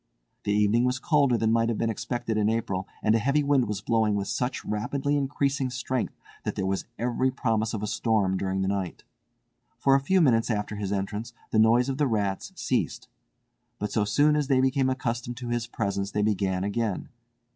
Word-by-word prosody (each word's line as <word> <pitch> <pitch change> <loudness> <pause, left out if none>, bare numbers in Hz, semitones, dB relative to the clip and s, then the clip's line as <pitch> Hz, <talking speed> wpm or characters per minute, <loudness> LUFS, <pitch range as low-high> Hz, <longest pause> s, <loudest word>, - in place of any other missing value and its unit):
The 105 - +1
evening 105 +3 +3
was 125 +1 +1
colder 140 -3 +3
than 110 0 +1
might 115 0 +2
have 115 - -1
been 115 -1 0
expected 120 +1 -3
in 105 0 +2
April, 100 -4 -1 0.2
and 110 - +4
a 115 - +3
heavy 140 +6 +2
wind 140 -4 +3
was 105 -1 -3
blowing 110 -1 +2
with 100 -1 -2
such 125 +1 -2
rapidly 135 +7 -1
increasing 140 -1 0
strength 125 0 -2 0.3
that - - -3
there 95 - -1
was 95 0 -1
every 125 +2 +1
promise 115 -4 0
of 105 - -4
a - - -1
storm 105 -4 +1
during 95 0 -1
the - - 0
night. 95 -3 -3 0.7
For 135 - +3
a 135 - +5
few 185 +8 +2
minutes 120 -9 +3
after 105 -1 -2
his 100 -2 -3
entrance 105 +4 -3 0.2
the 110 - +3
noise 115 +3 +5
of 135 +1 -3
the 145 - +3
rats 100 -5 -1
ceased; - - -2 0.7
but 105 - -3
so 110 - +1
soon 145 +9 +3
as 150 -2 0
they 135 -2 +3
became 130 0 +2
accustomed 120 -2 -3
to 120 -1 -5
his 120 0 -1
presence 100 -4 -2
they 105 +1 0
began 95 -3 0
again. 105 0 -2
115 Hz, 200 wpm, -27 LUFS, 105-130 Hz, 0.7 s, a